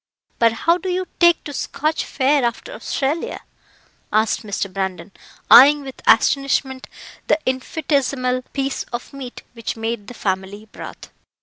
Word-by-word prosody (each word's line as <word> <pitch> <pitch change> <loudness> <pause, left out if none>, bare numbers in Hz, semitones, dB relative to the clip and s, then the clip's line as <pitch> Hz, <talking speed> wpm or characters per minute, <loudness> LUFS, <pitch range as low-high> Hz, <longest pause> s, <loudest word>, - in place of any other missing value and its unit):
But 230 -1 +4
how 335 +9 +2
do 370 - -4
you 365 +1 -1
take 345 -1 +5
to 290 - -7
Scotch 305 +3 -2
fare 275 0 +2
after 240 - -2
Australia?" 320 - -2 0.7
asked 215 +1 +2
Mr. 200 -3 -4
Brandon, 190 -1 -4 0.4
eyeing 290 +2 +9
with 265 -1 -10
astonishment 270 -1 +2 0.4
the - - +4
infinitesimal 260 -1 0
piece 275 -1 -2
of 240 +2 -7
meat 265 -3 -8
which 230 -1 -5
made 225 -2 -3
the 245 - -9
family 195 +1 -3
broth. - - -10
260 Hz, 135 wpm, -20 LUFS, 225-290 Hz, 0.7 s, eyeing